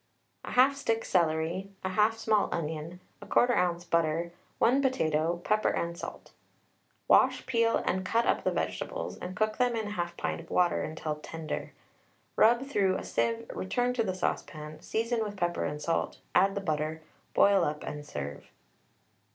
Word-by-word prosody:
1/2 260 +3 +4
stick 225 -5 -1
celery, 170 +2 +1 0.2
1/2 210 +4 +3
small 220 -2 +1
onion, 160 +2 -4 0.2
1/4 245 0 +3
oz. 175 -1 +1
butter, 170 0 +1 0.3
1 255 +4 +4
potato, 170 - +1
pepper 215 0 +2
and 170 0 -2
salt. - - -8 0.8
Wash, - - +4
peel, 230 -3 +2
and 185 +1 0
cut 230 +5 +1
up - - +1
the - - +2
vegetables, - - -3
and 185 +1 -6
cook 215 +2 0
them 245 -1 +2
in 215 -2 -3
1/2 175 -3 -3
pint - - -2
of 165 - -16
water 175 -3 +1
till 155 -2 -3
tender. 160 +1 -5 0.6
Rub 235 +4 +5
through 200 -9 +1
a - - -6
sieve, 230 0 -1
return 245 +6 0
to 245 - 0
the 190 -3 -2
saucepan, 155 -4 -4
season 230 +1 -1
with 205 -1 -5
pepper 175 -1 0
and 150 - -3
salt, 165 +2 -1 0.2
add 195 0 +4
the 200 - -2
butter, 155 -2 -2 0.3
boil 200 -2 +5
up, 150 -1 -2
and 150 0 -5
serve. 70 - -6
185 Hz, 160 wpm, -29 LUFS, 165-225 Hz, 0.8 s, Rub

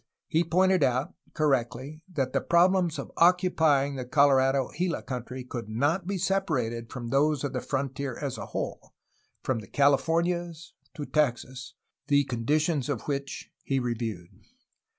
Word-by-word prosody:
He 165 0 +2
pointed 185 +2 +3
out, 130 +6 0 0.2
cor 155 -2 +2
rectly, 130 +4 -2
that 135 -6 -2
the - - +1
problems 175 -1 +3
of - - -6
occupying 160 -6 +3
the 130 - -3
Colorado 135 -1 +3
Gila 175 -1 -1
country 125 0 -5
could 120 -3 -6
not 145 - 0
be 200 0 -1
separated 130 - -1
from 120 -2 -6
those 145 +2 +2
of 140 -2 -2
the 125 - -2
frontier 135 -1 -3
as 140 -3 -4
a - - -6
whole, - - -5 0.5
from 130 -3 0
the 105 - -10
Californias 165 - +1 0.2
to 145 - -5
Texas, 130 -2 -1 0.3
the 145 0 +4
conditions 140 +4 0
of 135 -6 -2
which 140 -1 -4
he 135 - -1
reviewed. 115 -8 -3
140 Hz, 150 wpm, -27 LUFS, 125-165 Hz, 0.5 s, the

